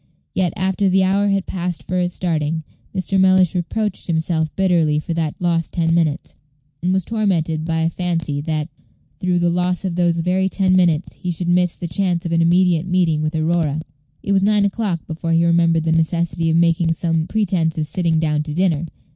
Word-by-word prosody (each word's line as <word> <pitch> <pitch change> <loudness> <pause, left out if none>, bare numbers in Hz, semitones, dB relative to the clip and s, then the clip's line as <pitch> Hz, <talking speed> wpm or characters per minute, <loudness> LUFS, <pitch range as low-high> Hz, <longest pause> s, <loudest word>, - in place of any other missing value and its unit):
Yet, 180 -3 +1
after 190 +1 +1
the 190 +1 +3
hour 200 +2 +2
had 195 -1 0
passed 180 -2 -4
for 185 0 -2
its 175 -1 -1
starting, 160 -2 -1 0.3
Mr. 190 0 -1
Mellish 185 -2 +4
reproached 200 +3 -2
himself 160 -1 0
bitterly 170 -6 +2
for 155 +2 -3
that 160 -2 -2
lost 170 -2 -1
ten 165 -1 +1
minutes, 165 -2 0 0.5
and 180 +2 0
was 190 -2 0
tormented 170 -8 -1
by 160 -1 -1
a 165 - +2
fancy 165 -5 -2
that, 155 0 -2 0.5
through 180 -1 0
the 175 0 +2
loss 180 +2 -1
of 180 -3 -2
those 175 -1 +1
very 185 +3 +1
ten 185 -1 +1
minutes, 175 -3 +2
he 180 - -6
should 175 0 -2
miss 180 0 +2
the 175 - -5
chance 175 +1 -1
of 170 - -3
an 165 0 +2
immediate 175 0 +3
meeting 175 -4 +1
with 155 +1 -2
Aurora. 160 -2 0 0.4
It 200 - -2
was 195 -1 +3
nine 205 0 +3
o'clock 200 -5 -2
before 165 0 -3
he 165 +1 +3
remembered 170 -1 +3
the 160 - 0
necessity 165 0 0
of 160 - +2
making 170 0 +2
some 165 -1 -1
pretence 180 -7 0
of 155 - 0
sitting 165 +1 0
down 150 -2 0
to 150 -1 -5
dinner. 170 -3 +1
170 Hz, 195 wpm, -20 LUFS, 160-185 Hz, 0.5 s, Mellish